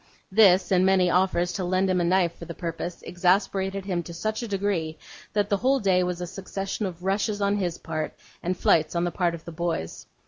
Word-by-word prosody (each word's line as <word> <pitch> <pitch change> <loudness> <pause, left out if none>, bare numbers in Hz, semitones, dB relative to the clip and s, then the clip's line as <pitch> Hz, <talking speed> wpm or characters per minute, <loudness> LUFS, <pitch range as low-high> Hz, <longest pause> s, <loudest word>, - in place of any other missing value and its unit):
This, 190 -3 +5
and 185 -1 +4
many 185 -2 +4
offers 180 -1 +2
to 185 - -2
lend 185 +2 +1
him 185 -1 +2
a - - +1
knife 175 -1 +2
for 170 - -9
the 170 - -7
purpose, 170 0 -5
exasperated 190 +2 +1
him 180 -3 -1
to 170 0 -9
such 215 +6 -2
a 235 - -4
degree, 195 -6 -1 0.4
that 205 -1 +1
the 200 - +2
whole 265 +5 +2
day 190 -4 +3
was 180 -1 -2
a - - -2
succession 195 +2 -4
of 180 -1 -9
rushes 205 +2 0
on 200 0 +1
his 175 -4 -2
part, 155 -1 -4 0.3
and 180 +2 -2
flights 160 -1 +2
on 170 - +1
the 175 - 0
part 170 0 0
of 165 - -13
the 170 - -7
boys. 165 - -3
185 Hz, 220 wpm, -26 LUFS, 170-195 Hz, 0.4 s, This